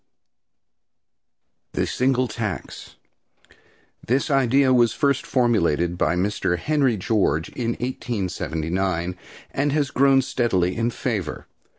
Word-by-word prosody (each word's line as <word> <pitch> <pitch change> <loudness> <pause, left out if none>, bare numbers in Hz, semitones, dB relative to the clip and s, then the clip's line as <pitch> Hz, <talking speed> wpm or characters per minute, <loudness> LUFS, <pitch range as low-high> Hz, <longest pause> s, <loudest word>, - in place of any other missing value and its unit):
THE - - 0
SINGLE 130 0 +1
TAX. 105 -5 -5 1.1
This 135 +5 0
idea 135 0 +3
was 120 -2 +4
first 140 -2 0
formulated 90 - +1
by 85 -1 +1
Mr. 90 -1 0
Henry 135 - +1
George 95 -5 0
in 120 -1 -2
1879, 90 - -2 0.4
and 145 +1 0
has 145 -2 0
grown 135 0 +4
steadily 95 -9 0
in 115 +1 0
favor. 105 -10 -3
115 Hz, 100 wpm, -23 LUFS, 90-130 Hz, 1.1 s, was